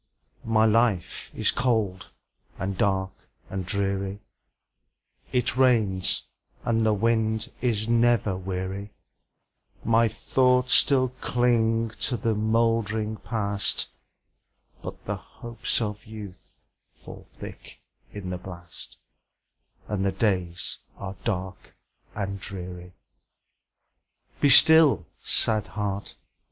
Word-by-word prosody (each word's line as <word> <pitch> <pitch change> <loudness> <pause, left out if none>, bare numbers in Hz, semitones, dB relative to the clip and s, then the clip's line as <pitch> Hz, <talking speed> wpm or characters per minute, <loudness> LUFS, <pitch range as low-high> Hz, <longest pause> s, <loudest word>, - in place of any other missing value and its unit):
My 110 -1 +4
life 110 -5 +1
is - - +2
cold, 110 -7 0 0.5
and 95 +2 -3
dark, 95 0 +1 0.4
and 95 -1 -3
dreary; 100 0 -1 1.1
It 125 -2 +2
rains, 110 -8 +3 0.4
and 115 -1 +2
the 110 - +3
wind 110 0 0
is 115 -3 +1
never 115 -4 +3
weary; 95 +2 -5 0.9
My 115 +1 +4
thoughts 125 +3 +2
still 130 -2 +5
cling 115 -2 +2
to 125 - 0
the 115 +1 0
moldering 110 0 +1
Past, 105 -3 -1 0.9
But - - -8
the - - -2
hopes 120 0 -4
of 105 -2 -4
youth 100 -4 -11 0.3
fall - - -12
thick - - -11 0.3
in 95 -3 -6
the 90 - -4
blast, 85 -2 -11 0.9
And 100 -2 -1
the 100 - +2
days 90 -4 -1 0.2
are 95 0 -6
dark 95 -4 -4 0.4
and 100 -1 -3
dreary. 90 -1 -8 1.4
Be 145 - +4
still, 160 +1 +7 0.2
sad 110 -2 +1
heart! 100 -1 -3
105 Hz, 100 wpm, -26 LUFS, 95-115 Hz, 1.4 s, still